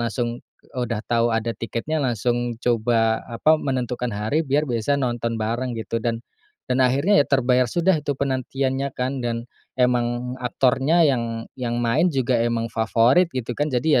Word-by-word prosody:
langsung 120 +1 -2 0.3
udah 120 -4 -3
tahu 120 0 +2
ada 115 0 -1
tiketnya, 120 +8 -3
langsung 120 -1 -1
coba 115 -1 +1
apa, 155 +7 +2
menentukan 125 -2 -2
hari 110 +9 0
biar 145 +3 +2
bisa 125 +2 0
nonton 120 -3 -1
bareng 115 +3 -2
gitu 115 +1 -3
dan 115 0 -2 0.4
dan 130 +1 0
akhirnya 140 +10 +4
ya - - +1
terbayar 125 -2 +3
sudah 175 +7 +2
itu 145 -2 -3
penantiannya 135 0 -1
kan, 130 +1 -2
dan 115 -1 -3 0.3
emang 125 -1 +1
aktornya 135 +6 +2
yang 115 -5 0 0.2
yang 120 -1 -1
main 140 +10 +3
juga 130 -6 +1
emang 115 -1 -1
favorit 115 +9 +3
gitu 125 -1 -3
kan, 145 +4 -1
jadi 130 +1 +2
125 Hz, 155 wpm, -23 LUFS, 115-135 Hz, 0.4 s, akhirnya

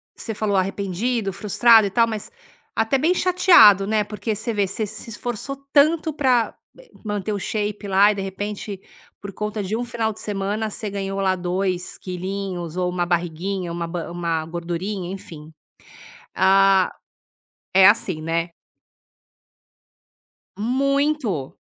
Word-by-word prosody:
Você 225 - -6
falou 205 -1 0
arrependido, 195 +3 -1
frustrado 220 +2 +5
e - - -3
tal, 230 +3 +4
mas 220 - -5 0.4
até 225 +5 +2
bem 315 +7 +2
chateado, 345 - +6
né. 215 0 +2
Porque, 210 +1 -4
você 225 +3 -3
vê, 205 -2 +1
você 215 +3 -3
se 215 +2 -10
esforçou 240 +4 -5 0.2
tanto 310 +2 +4
pra 255 -5 +1 0.5
manter 205 0 -2
o 205 - -2
shape 210 0 -3
lá 200 +2 +5
e, - - -3
de 200 - -4
repente, 200 +1 -5 0.4
por 200 - -7
conta 210 +1 -3
de 195 +3 -2
1 245 - -3
final 230 -2 -2
de 215 - -13
semana, 210 +2 -2
cê 215 0 -5
ganhou 195 0 -4
lá 190 -1 +2
2 185 +1 -2
quilinhos 185 -2 -5
ou 180 -1 0
uma 180 -1 -1
barriguinha, 175 +1 -2
uma 170 0 -3
ba 170 0 -5
uma 170 -2 -2
gordurinha, 175 +3 -4
enfim, 165 -6 -10 0.8
ah 195 0 +4 0.8
É 190 0 +8
assim, 190 -6 +1
né? 165 +1 -2 2.1
Muito. 265 - 0
200 Hz, 140 wpm, -22 LUFS, 185-220 Hz, 2.1 s, É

